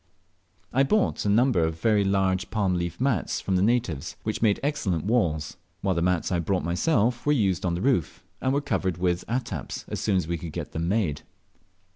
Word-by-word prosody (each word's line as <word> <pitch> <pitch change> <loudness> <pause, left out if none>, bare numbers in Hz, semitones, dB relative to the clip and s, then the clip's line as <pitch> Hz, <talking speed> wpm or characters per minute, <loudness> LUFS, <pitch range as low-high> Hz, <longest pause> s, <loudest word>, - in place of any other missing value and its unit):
I 130 - +4
bought 200 - +1
a - - +2
number 115 -1 +3
of 80 0 -2
very 105 +1 +3
large 95 -1 +1
palm 100 -4 0
leaf 85 -1 -3
mats 125 - 0
of 95 - +2
the 90 - +2
natives, 105 - 0
which - - -3
made 105 -3 +3
excellent 95 - -1
walls; 85 -10 0 0.2
while 95 -1 +1
the 85 - -1
mats 90 0 +1
I 90 - +2
had 85 - -3
brought 95 -2 0
myself 115 - +1
were 150 - +3
used 95 - +1
on 85 - 0
the 90 - -3
roof, 120 - 0 0.2
and 130 - +1
were 140 +1 +1
covered 105 - -1
over 90 - -9
with 90 0 +1
attaps 115 - -3
as - - -3
soon 100 -3 +1
as 90 - -1
we 85 -1 -2
could 85 -4 -7
get - - -5
them 80 +1 -2
made. 90 -7 0
95 Hz, 215 wpm, -26 LUFS, 85-120 Hz, 0.2 s, I